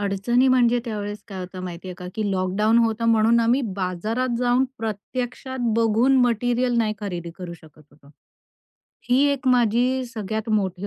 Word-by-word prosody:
अडचणी 205 +6 +1
म्हणजे, 245 -1 +4
त्यावेळेस 210 -2 -5
काय 195 - -7
होतं 185 0 -7
माहितीये 180 +1 -7
का, 180 - -7
की 215 -2 -1
लॉकडाउन 195 +5 +2
होतं 230 0 +1
म्हणून 230 +1 +4
आम्ही 235 +4 +2 0.2
बाजारात 215 +7 -2
जाऊन 245 +1 +2
प्रत्यक्षात 245 +4 -5 0.2
बघून 230 +4 +3
मटेरिअल 245 +1 0
नाही 215 -2 +1
खरेदी 175 -4 -5
करू 180 -2 -6
शकत 155 -1 -18
होतो. 145 -1 -21 1.0
ही 250 - +5
एक 275 -1 -5
माझी 250 +2 +2
सगळ्यात 220 -1 -5
मोठी 195 -2 -1
220 Hz, 150 wpm, -23 LUFS, 195-245 Hz, 1.0 s, ही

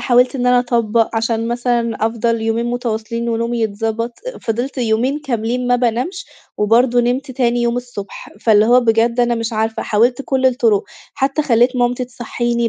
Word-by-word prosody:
حاولت 250 +2 +3
إن 250 -1 -1
أنا 250 0 +5
أطبّق، 230 -2 +1
عشان 225 0 -1
مثلًا 235 -2 0
أفضل 230 0 -1
يومين 225 +1 0
متواصلين 235 -1 -3
ونومي 230 +1 -1
يتضبط، 225 +2 -2 0.3
فضلت 245 +4 -3
يومين 245 +5 0
كاملين 245 -2 -2
ما 245 0 +3
بانامش 245 - -2 0.3
وبرضو 235 +4 +3
نمت 250 +3 0
تاني 240 -2 0
يوم 235 0 0
الصبح. 245 -5 -7
فاللي 215 -2 +4
هو 250 +1 +5
بجد 235 +1 +2
أنا 240 0 +2
مش 230 0 -3
عارفة، 220 +1 -1
حاولت 240 +5 +1
كل 265 -1 +1
الطرق، 230 -5 +2 0.3
حتى 275 +3 0
خليت 250 -1 +2
مامتي 245 +1 0
تصحيني، 240 -1 -2
235 Hz, 160 wpm, -18 LUFS, 225-245 Hz, 0.3 s, أنا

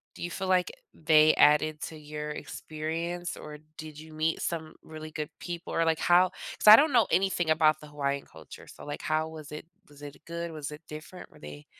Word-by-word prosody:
do - - -8
you 175 - -3
feel 190 +2 -4
like 180 -1 +2 0.2
they 155 0 +5
added 150 +1 +4
to 160 - -6
your 150 0 -6
experience, 165 +4 -5
or 150 -1 -9 0.2
did 155 -1 -9
you 160 0 -12
meet 155 +1 -1
some 160 -2 -4
really 155 0 -9
good 150 0 -4
people? 175 -1 -6
Or, 165 - +2
like, 160 -1 +1
how 180 +1 +5 0.3
'cause - - -3
I 210 - +13
don't 295 +6 +4
know 235 -3 +5
anything 185 -3 +1
about 155 -1 +4
the 150 - -12
Hawaiian 140 -1 -3
culture, 80 -1 -13
so, - - -12
like, 145 - -6
how 155 0 -1
was 155 -2 -10
it 150 - -7 0.2
was 145 -1 -17
it 145 -1 -9
good? 170 0 -5
Was 150 -2 -6
it 150 - -9
different? 155 +4 -10
Were - - -18
they 75 0 -10
155 Hz, 215 wpm, -28 LUFS, 150-170 Hz, 0.3 s, I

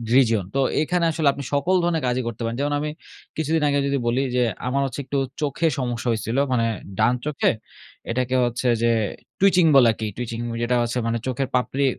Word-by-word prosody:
region। 115 -7 +4
তো - - +2 0.2
এখানে 175 +2 +1
আসলে 155 -2 0
আপনি 140 - -7
সকল 145 +7 +2
ধরনের 165 -3 0
কাজই 125 +1 0
করতে 120 0 -6
পারেন। 115 +1 -2
যেমন 145 0 0
আমি 150 +1 -2 0.5
কিছুদিন 160 0 0
আগে 140 0 +2
যদি 140 - +1
বলি 120 +3 +2
যে, 125 - +3 0.3
আমার 140 +2 +1
হচ্ছে 135 +1 -5
একটু 140 - -2 0.2
চোখে 150 +3 0
সমস্যা 120 -1 -3
হইছিল। 115 +3 -2 0.2
মানে 115 -2 +2 0.3
ডান 110 +3 +3
চোখে, 150 -2 +1 0.6
এটাকে 125 +1 0
হচ্ছে 120 +1 -2 0.2
যে 115 - +4 0.5
twitching 185 -3 +5
বলা 125 -4 +7
কি 110 - -2
twitching 115 -1 -4
ওই - - -4
যেটা 125 +1 +1
হচ্ছে 120 +1 -2
মানে 115 0 0
চোখের 130 +1 -1
পাপড়ি 135 +2 +1
130 Hz, 195 wpm, -23 LUFS, 120-145 Hz, 0.6 s, বলা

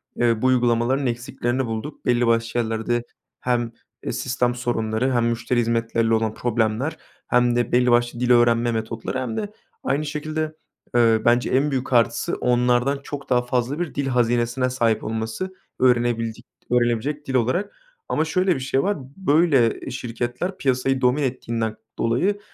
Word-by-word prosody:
eee, 115 -2 +1
bu - - 0
uygulamaların 125 +1 +2
eksiklerini 120 +1 -2
bulduk. 115 +6 -6
Belli 120 -1 +2
başlı 115 +1 +1
yerlerde 115 +1 -1 0.4
hem, 120 -2 0 0.3
eee, - - -2
sistem 125 -1 -1
sorunları 120 0 -1
hem 120 -1 +2
müşteri 120 +1 0
hizmetleriyle 115 -1 +1
olan 110 -1 +1
problemler 115 +5 -1 0.3
hem 120 -1 +3
de 120 -1 0
belli 125 0 +3
başlı 120 0 +2
dil 125 0 +1
öğrenme 120 0 +4
metotları 115 +3 -3
hem 125 -4 -3
de 205 0 -3 0.3
aynı 140 +3 0
şekilde, 155 +1 -3 0.4
eee, 115 -2 +4
bence 120 +1 +3
en 140 +3 +2
büyük 130 -1 -2
artısı 115 -1 +2
onlardan 125 +3 +2
çok 140 -1 -7
daha 125 -1 +3
fazla 125 +4 -1
bir 175 -3 -3
dil 140 -1 -1
hazinesine 120 0 +1
sahip 115 -3 +1
olması. 110 +12 -3 0.3
Öğrenebildik 120 -2 +1 0.3
öğrenebilecek 125 +5 0
dil 130 - -2
olarak. 130 - 0 0.4
Ama 155 - +1
şöyle 185 +3 +1
bir 130 - -3
şey 135 +1 0
var; 205 +1 0 0.2
böyle, 160 -5 +4 0.2
ııı, - - -6
şirketler 125 +9 -4
piyasayı 135 -1 0
domine 125 +3 +2
ettiğinden 115 -3 -3 0.2
dolayı 180 - +1
120 Hz, 155 wpm, -23 LUFS, 115-135 Hz, 0.4 s, öğrenme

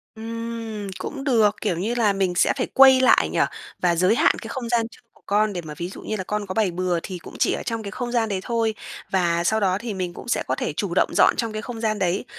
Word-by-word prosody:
Ừm, 225 -1 -5
cũng 275 +7 -5
được, 225 -7 +3
kiểu 195 -6 0
như 215 +7 -1
là 220 -4 +3
mình 190 -2 0
sẽ - - +3
phải 255 - -1
quây 265 -1 +8
lại 260 - +4
nhỉ? - - -1 0.4
Và 175 -1 +2
giới 185 +6 +3
hạn - - +4
cái 225 - -7
không 240 -2 -5
gian 235 -1 +2
chơi - - -17
của - - -26
con 210 +1 +2
để 175 - -3
mà 155 -2 -8
ví 175 +1 -4
dụ - - -10
như 215 - -3
là 190 - -3
con 210 +2 -3
có 185 - -5
bày 210 -2 +1
bừa 180 0 -1
thì 185 - -5
cũng 170 - -12
chỉ - - +3
ở - - -4
trong 230 -1 -3
cái 200 - -6
không 240 +3 -4
gian 230 -2 +1
đấy 195 -2 -1
thôi. 230 -2 0 0.4
Và 170 -2 +1
sau 220 +5 +2
đó 190 -3 +2
thì 225 +1 -5
mình 180 -2 -3
cũng - - -10
sẽ 240 - 0
có - - 0
thể - - -3
chủ - - -2
động - - +3
dọn - - +6
trong 230 -2 -2
cái 215 - -3
không 235 0 -7
gian 215 -2 0
đấy, 185 0 0
215 Hz, 280 wpm, -23 LUFS, 185-230 Hz, 0.4 s, quây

